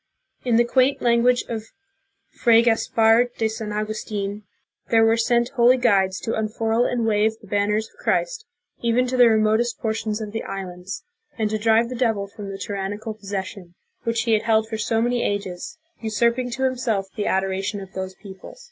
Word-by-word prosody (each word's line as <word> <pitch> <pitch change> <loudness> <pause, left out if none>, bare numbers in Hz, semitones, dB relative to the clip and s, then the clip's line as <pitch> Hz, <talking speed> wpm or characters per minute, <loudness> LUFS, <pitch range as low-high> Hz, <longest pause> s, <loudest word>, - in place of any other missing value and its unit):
In 245 -2 +1
the 235 +1 +4
quaint 260 +3 +2
language 240 +1 +3
of 220 -2 -4 0.7
Fray 230 -1 +4
Gaspar 225 0 +3
de 225 - +1
San 220 -1 -5
Augustln, 210 -1 -3 0.5
there 225 -1 +5
were 225 0 +4
sent 235 +1 +2
"holy 255 -1 +4
guides 195 -6 +2
to 225 - -2
unfurl 225 +2 0
and 240 -2 0
wave 215 0 +2
the - - -16
banners 210 +2 0
of - - -27
Christ, - - 0 0.4
even 235 +2 +2
to 255 +1 -2
the 245 -2 +7
remotest 220 +2 +2
portions 220 -1 -2
of 215 -2 -5
the 225 - -3
islands, 185 -1 -6 0.3
and 215 -2 0
to 215 - -1
drive 225 +2 +3
the 250 - -5
devil 225 -5 0
from 200 0 -9
the 195 - -6
tyrannical 205 +2 -4
pos 210 -2 -12
session, 190 -3 -5 0.3
which 230 -1 -1
he 230 -1 +1
had 215 - +3
held 220 -1 +2
for 220 0 -4
so 225 +1 +1
many 240 0 0
ages, 200 - -3 0.2
usurping 235 +3 0
to 255 +2 -3
himself 245 -6 0
the 210 - -2
adoration 195 +2 -1
of 195 -1 -10
those 190 0 -5
peoples." 190 - -12
220 Hz, 185 wpm, -23 LUFS, 205-235 Hz, 0.7 s, the